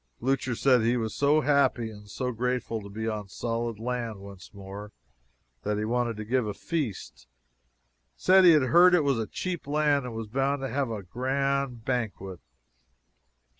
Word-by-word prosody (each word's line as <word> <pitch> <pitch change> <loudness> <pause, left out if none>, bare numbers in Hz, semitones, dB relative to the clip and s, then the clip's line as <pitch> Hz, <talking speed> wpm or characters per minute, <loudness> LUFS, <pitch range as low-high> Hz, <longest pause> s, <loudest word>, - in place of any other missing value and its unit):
Blucher 130 -1 0
said 125 0 +4
he 120 +2 +2
was 110 -2 -2
so 145 +2 +3
happy 135 -5 +2
and 105 -1 -13
so 125 +4 -3
grateful 125 -1 -2
to 100 - -10
be 110 +2 -4
on 105 -2 -3
solid 115 +1 -3
land 115 -1 -3
once 100 -2 -12
more 100 +1 -9 0.7
that 105 0 -1
he 105 - -1
wanted 120 -1 -1
to 110 - -5
give 125 0 0
a 105 - -4
feast 145 - -4 0.9
said 190 +1 +5
he 175 -2 +8
had 150 -3 +4
heard 175 +7 +6
it 165 - +3
was 135 -4 +1
a 110 - -2
cheap 175 - -4
land, 145 -2 +2
and 125 - -6
he - - -6
was 115 -1 -5
bound 135 +4 -1
to 135 - -2
have 135 +1 -1
a 110 -3 -5
grand 130 +2 -1
banquet. 105 -8 -3
120 Hz, 180 wpm, -27 LUFS, 110-140 Hz, 0.9 s, he